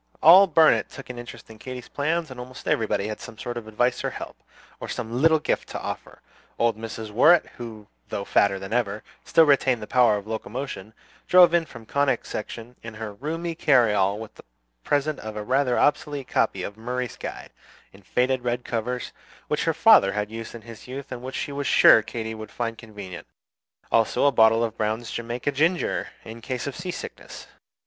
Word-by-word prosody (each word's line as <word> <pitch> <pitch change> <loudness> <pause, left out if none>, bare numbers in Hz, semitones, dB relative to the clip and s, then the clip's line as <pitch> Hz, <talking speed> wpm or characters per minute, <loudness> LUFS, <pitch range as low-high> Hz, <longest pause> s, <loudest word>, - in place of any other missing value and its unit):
All 185 +5 +9
Burnet 160 -2 +4
took 135 -3 -9
an 120 - -9
interest 120 -1 -10
in 110 - -14
Katy's 130 0 -8
plans, 160 +1 -2
and 125 - -9
almost 125 +1 -10
everybody 105 -2 0
had 110 - -5
some 115 - -10
sort 120 +2 -5
of 115 -2 -6
advice 120 +3 0
or - - 0
help, - - -8 0.4
or - - -7
some 115 +3 -4
little 160 0 +5
gift 150 - -2
to - - -5
offer. - - -7 0.3
Old 115 -2 +2
Mrs. 110 0 -7
Worrett, 160 +11 +5
who, 110 -3 -8 0.2
though 100 - -4
fatter 100 -1 +3
than 95 +2 -7
ever, 105 -3 -1 0.2
still 165 - +5
retained 135 -4 +3
the 105 - -6
power 120 -3 +4
of 100 - -8
locomotion, 110 -1 -6 0.3
drove 180 -2 +7
in 170 -1 +3
from 115 -4 -12
Conic 140 0 0
Section 115 +3 -7
in 115 -1 -9
her 110 -1 -6
roomy 165 +9 -4
carryall 105 - +3
with 110 -1 -9
the - - -15 0.4
present 145 +1 0
of 110 -1 -7
a 105 - -4
rather 130 +2 +1
obsolete 145 -2 +1
copy - - 0
of 105 - -6
"Murray's 125 +1 -4
Guide," - - -8 0.4
in 95 - -16
faded 125 +6 0
red 120 0 -2
covers, 120 +2 -3 0.4
which - - 0
her - - +3
father 100 0 +6
had 105 0 -2
used 115 +1 -7
in 115 - -10
his 115 +1 -12
youth, 135 +2 -7
and 125 -1 -6
which 130 +1 -7
she - - -3
was 140 0 -3
sure - - +7
Katy 110 0 -5
would 110 -1 -8
find 115 +2 -3
convenient; 105 -5 -10 0.6
also 115 +4 +2
a 140 - +5
bottle 115 -1 +5
of 115 -1 -2
Brown's 110 +2 -2
Jamaica 120 +4 -3
Ginger, 160 +6 0 0.2
in 115 +1 -9
case 125 +1 -4
of 140 -2 -5
sea 180 +1 -6
sickness. 180 - -8
120 Hz, 195 wpm, -24 LUFS, 110-135 Hz, 0.6 s, All